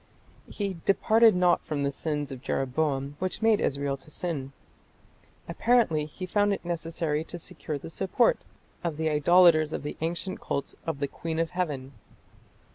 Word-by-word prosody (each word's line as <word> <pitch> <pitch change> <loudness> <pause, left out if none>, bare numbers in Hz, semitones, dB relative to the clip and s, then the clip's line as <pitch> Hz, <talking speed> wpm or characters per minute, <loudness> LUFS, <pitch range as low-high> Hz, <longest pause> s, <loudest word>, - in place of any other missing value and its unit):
He 200 -3 -3
departed 220 +2 +5
not 180 -1 +3
from 145 -2 -2
the 140 - +1
sins 145 -1 -3
of 130 -2 -7
Jeroboam, 140 +1 -1
which 185 +4 -3
made 220 -2 +4
Israel 140 0 -1
to 135 - -16
sin." 155 -6 -3 1.0
Apparently 225 -11 +2
he 170 +5 -7
found 205 +2 +2
it - - -12
necessary 165 -2 -2
to 175 - -7
secure 155 -2 -6
the 145 - -9
support 195 - +2 0.4
of 165 -4 -2
the 160 0 0
idolators 155 0 +5
of - - -3
the 150 - -5
ancient 170 +3 -3
cult 140 - -3
of 155 -3 -3
the 140 - +1
"Queen 160 +3 -5
of 165 +1 0
Heaven". 150 -8 -3
160 Hz, 160 wpm, -27 LUFS, 145-180 Hz, 1.0 s, departed